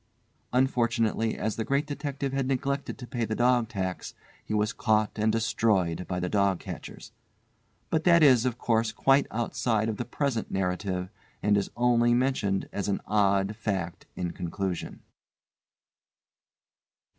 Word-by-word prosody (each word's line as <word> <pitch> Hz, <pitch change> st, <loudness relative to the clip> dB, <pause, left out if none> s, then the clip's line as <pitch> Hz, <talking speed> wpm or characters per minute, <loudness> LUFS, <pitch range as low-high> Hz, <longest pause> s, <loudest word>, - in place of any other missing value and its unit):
Unfortunately 115 Hz, -3 st, +1 dB
as 110 Hz, -1 st, -2 dB
the 110 Hz, -, -1 dB
Great 140 Hz, +5 st, 0 dB
Detective 140 Hz, -2 st, -4 dB
had 135 Hz, -1 st, 0 dB
neglected 135 Hz, +1 st, -2 dB
to 130 Hz, -, -8 dB
pay 120 Hz, -1 st, -3 dB
the 110 Hz, 0 st, -1 dB
dog 120 Hz, -1 st, +3 dB
tax, 95 Hz, -4 st, -4 dB, 0.3 s
he -, -, -9 dB
was 105 Hz, 0 st, +1 dB
caught 110 Hz, -1 st, +1 dB
and 110 Hz, +1 st, +3 dB
destroyed 110 Hz, -6 st, +1 dB
by 90 Hz, -1 st, -2 dB
the 90 Hz, -, -1 dB
dog 100 Hz, -1 st, +2 dB
catchers. -, -, -9 dB, 0.8 s
But 160 Hz, -1 st, +1 dB
that 170 Hz, -2 st, +6 dB
is, 130 Hz, -5 st, +6 dB
of 125 Hz, -2 st, -1 dB
course, 115 Hz, -2 st, +1 dB
quite 135 Hz, +1 st, +3 dB
outside 115 Hz, -1 st, 0 dB
of 110 Hz, -, -3 dB
the 120 Hz, -, -3 dB
present 135 Hz, -6 st, -2 dB
narrative, 90 Hz, 0 st, -2 dB, 0.3 s
and 105 Hz, 0 st, +4 dB
is 100 Hz, -1 st, 0 dB
only 120 Hz, -1 st, +3 dB
mentioned 120 Hz, -7 st, 0 dB
as 100 Hz, -, -2 dB
an 100 Hz, -, 0 dB
odd 100 Hz, 0 st, +2 dB
fact 95 Hz, -6 st, -3 dB
in 90 Hz, -2 st, -3 dB
conclusion. 90 Hz, +1 st, -4 dB
110 Hz, 145 wpm, -28 LUFS, 100-125 Hz, 0.8 s, that